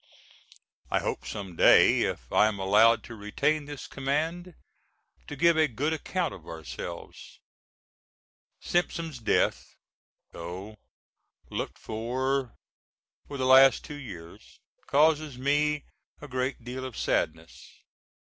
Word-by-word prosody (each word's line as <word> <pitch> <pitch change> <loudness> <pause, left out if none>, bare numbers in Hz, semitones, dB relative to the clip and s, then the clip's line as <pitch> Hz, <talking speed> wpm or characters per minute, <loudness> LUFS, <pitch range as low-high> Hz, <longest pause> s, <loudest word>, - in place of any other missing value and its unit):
I - - +1
hope - - -3
some 95 -4 -6
day, - - +6
if - - -3
I 105 - +5
am 110 -2 -2
allowed 110 +4 +4
to 120 - -10
retain 140 +8 -1
this 145 -2 -8
command, 160 +6 -2 0.7
to 145 - -6
give 170 +3 +4
a 155 - +5
good 145 +5 -1
account 170 +1 -2
of 85 - -13
ourselves. 80 -2 -8 1.2
Simpson's 165 -5 -2
death, 115 - 0 0.6
though 95 +6 -8 0.7
looked - - -4
for 130 +3 -2 0.7
for 140 - -6
the 130 - -1
last 130 0 +7
two - - -8
years, 95 - -11 0.3
causes 150 -1 +2
me 145 +2 +1 0.4
a 145 - -9
great 130 -1 -3
deal 125 +2 -6
of 130 -3 -7
sadness. 80 +1 -3
130 Hz, 120 wpm, -28 LUFS, 110-150 Hz, 1.2 s, last